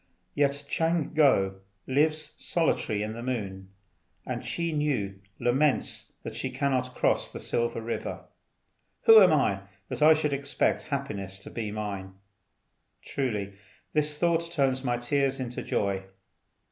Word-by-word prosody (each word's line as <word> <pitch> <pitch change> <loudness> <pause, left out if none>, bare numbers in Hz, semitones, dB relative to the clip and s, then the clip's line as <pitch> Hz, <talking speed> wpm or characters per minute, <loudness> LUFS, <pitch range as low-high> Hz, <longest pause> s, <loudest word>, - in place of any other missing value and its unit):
Yet 140 0 +1
Ch'ang 165 -1 0
ngo 95 -11 +3 0.3
lives 155 +3 +1
solitary 110 -10 0
in 110 +1 -3
the 115 - -7
moon, 100 -7 -4 0.6
and - - -3
Chih 170 -1 -2
Nü 125 -11 -1 0.2
laments 130 +4 +1
that - - -5
she - - -3
cannot 130 -2 -1
cross - - +1
the - - -7
Silver 120 -1 -1
River. 115 +1 -4 0.8
Who 225 -1 +10
am 185 -3 +7
I 105 -10 +2 0.3
that 130 0 -5
I 155 +1 +8
should 150 -2 0
expect 140 +2 0
happiness 100 -10 -3
to - - -9
be 110 -3 -3
mine? 100 -3 -5 0.9
Truly 105 -8 -2 0.4
this 150 -1 +1
thought 170 0 +1
turns 135 -4 +1
my 120 -2 +1
tears 135 +2 0
into 125 -1 -4
joy. 100 -1 -1
130 Hz, 135 wpm, -28 LUFS, 105-150 Hz, 0.9 s, Who